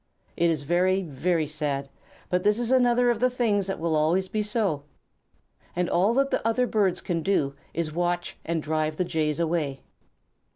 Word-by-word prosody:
It 170 0 +2
is 155 -3 -1
very, 185 +5 +2
very 160 +2 0
sad, 145 -2 -3 0.4
but 180 0 +1
this 210 +1 +3
is 240 0 -1
another 245 -1 +4
of 230 - -2
the 255 +2 +3
things 215 -6 0
which 195 - -2
will 165 -1 0
always 165 +5 +2
be 215 +3 -1
so, 210 -8 -1 0.9
and 180 0 0
all 195 +8 +2
that 275 +1 +2
the - - 0
other 230 +3 +2
birds 200 -6 +1
can 170 -3 -2
do 150 -6 +1 0.2
is 165 -1 -2
to - - -11
watch 175 +1 -1
and 165 -2 -2
drive 155 0 -1
the 180 - +1
Jays 155 -3 -1
away. 155 -5 -1
175 Hz, 190 wpm, -26 LUFS, 155-210 Hz, 0.9 s, another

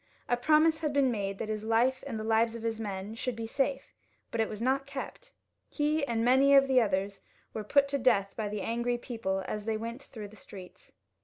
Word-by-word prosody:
A 245 - +2
promise 310 +5 +3
had 300 -3 -2
been 275 -2 +3
made 200 -3 -3
that 220 - -4
his 215 -1 -3
life 235 +4 +2
and 230 -5 -4
the - - -4
lives 225 +1 +2
of 230 - -7
his 225 -1 -2
men 200 -1 -5
should 240 +1 -3
be 230 0 -5
safe, 270 +3 -2 0.4
but 230 - 0
it 220 - 0
was 210 - -6
not 265 +3 0
kept. 280 - -7 0.4
He 300 0 0
and 230 -1 0
many 270 +3 +5
of 275 0 +6
the 260 -2 +4
others 195 -2 -1 0.3
were 215 - -4
put 280 +6 +3
to 280 0 -1
death 215 -6 +2
by 215 -2 -3
the 210 -1 -4
angry 235 +3 -1
people 210 -6 -3
as 210 +1 -4
they 220 -1 0
went 230 +4 -6
through 215 -7 -9
the 215 - -15
streets. 190 -3 -12
230 Hz, 225 wpm, -30 LUFS, 215-270 Hz, 0.4 s, of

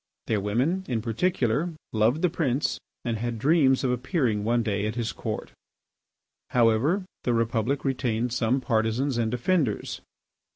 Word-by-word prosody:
Their 110 - +1
women, 130 - 0
in 120 -3 0
particular, 135 +4 0 0.2
loved 115 +9 +2
the 180 - +4
Prince 140 -5 0 0.3
and 115 -2 -1
had 120 0 -2
dreams 135 +1 +3
of 130 - +2
appearing 125 - 0
one 120 +2 +2
day 105 -1 -1
at 110 - -3
his 120 -2 -1
Court. - - -5 1.0
However, 125 - +3 0.2
the 120 - +1
Republic 115 +4 0
retained 125 -3 0
some 125 +2 +1
partisans 120 +2 0
and 115 -1 +1
defenders. 125 - 0
120 Hz, 140 wpm, -26 LUFS, 110-140 Hz, 1.0 s, the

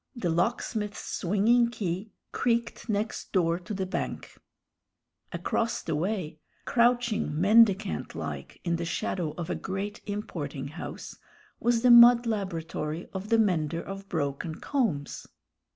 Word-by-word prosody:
The 185 -9 -1
locksmith's 210 +3 -1
swinging 220 +6 +2
key 200 -2 -4 0.2
creaked 235 -1 -1
next 210 +1 -2
door 170 -3 +2
to 180 - -10
the 190 -2 -2
bank; 185 - -4 1.0
across 230 0 -1
the 160 - -2
way, 165 -2 -2 0.3
crouching 235 -10 +2
mendicant 210 +1 +4
like - - -6
in 170 -1 0
the 170 - -3
shadow 165 -1 -2
of 175 0 -4
a - - 0
great 195 +2 -4
importing 150 -10 -4
house, 160 +4 -8 0.4
was 235 0 +1
the 250 - +7
mud 240 0 +9
laboratory 170 -6 -3
of 190 +2 -5
the 230 - +4
mender 170 -7 +1
of 195 0 -8
broken 155 +1 -2
combs. 205 - -2
195 Hz, 130 wpm, -28 LUFS, 165-230 Hz, 1.0 s, mud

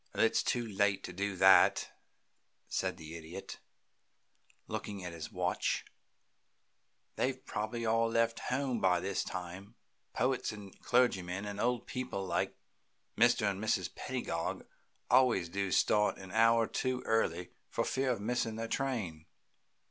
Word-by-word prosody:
"It 115 - +4
is - - +2
too 120 -1 0
late 100 -1 +1
to - - -6
do 100 +2 -2
that," 95 +1 +6 0.8
said 95 -1 -2
the 80 -1 -9
Idiot, 85 +4 -8 1.1
looking 100 -3 -5
at 90 - -5
his 80 -2 -7
watch. - - -1 1.3
"They've 130 0 -1
probably 110 +3 -3
all 115 +1 +2
left 115 0 +1
home 130 -2 0
by 90 -3 +3
this 95 +2 -1
time. 90 +2 -7 0.4
Poets 130 +2 +1
and 105 -3 -10
clergymen 100 -6 +1
and 100 -1 -5
old 120 -1 0
people 125 -6 -4
like 85 -2 -1 0.6
Mr. 115 -2 +4
and 100 +2 -6
Mrs. 110 - 0
Pedagog - - -3 0.5
always 125 -9 +4
do 100 +1 -2
start 105 +2 +3
an 95 -1 -10
hour 115 +1 +5
too 130 +2 -2
early, 90 -6 0 0.2
for - - 0
fear 135 0 0
of 120 - 0
missing 115 +1 -1
their 115 +1 -3
train." 110 - -2
105 Hz, 140 wpm, -33 LUFS, 95-120 Hz, 1.3 s, that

